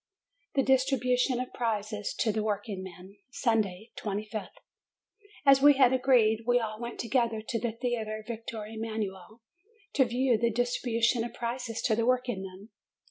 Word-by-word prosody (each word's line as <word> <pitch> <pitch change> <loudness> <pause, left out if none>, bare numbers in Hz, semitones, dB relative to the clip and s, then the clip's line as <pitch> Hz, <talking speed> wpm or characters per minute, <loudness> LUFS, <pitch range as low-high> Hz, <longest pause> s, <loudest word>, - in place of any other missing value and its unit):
THE 270 - +3
DISTRIBUTION 255 -1 +2
OF 255 - -5
PRIZES 210 -3 -2
TO 220 - +1
THE 215 +1 -1
WORKINGMEN 195 -2 -5
Sunday, 220 -5 -1
25th. 210 +1 -4 1.0
As 275 -1 +7
we 290 +1 +8
had 260 -2 +5
agreed, 235 -4 +3
we 245 0 +4
all 215 -2 -4
went 235 0 -6
together 235 -2 +1
to 230 - -1
the 225 0 -2
Theatre 220 -2 -3
Victor 225 -2 -5
Emanuel, 220 -1 -5 0.5
to 265 - +4
view 245 -1 +1
the 235 +1 +2
distribution 235 0 +1
of 240 - -6
prizes 235 -1 -4
to 220 - +2
the 230 +1 0
workingmen. 210 -6 -2
230 Hz, 140 wpm, -29 LUFS, 215-245 Hz, 1.0 s, we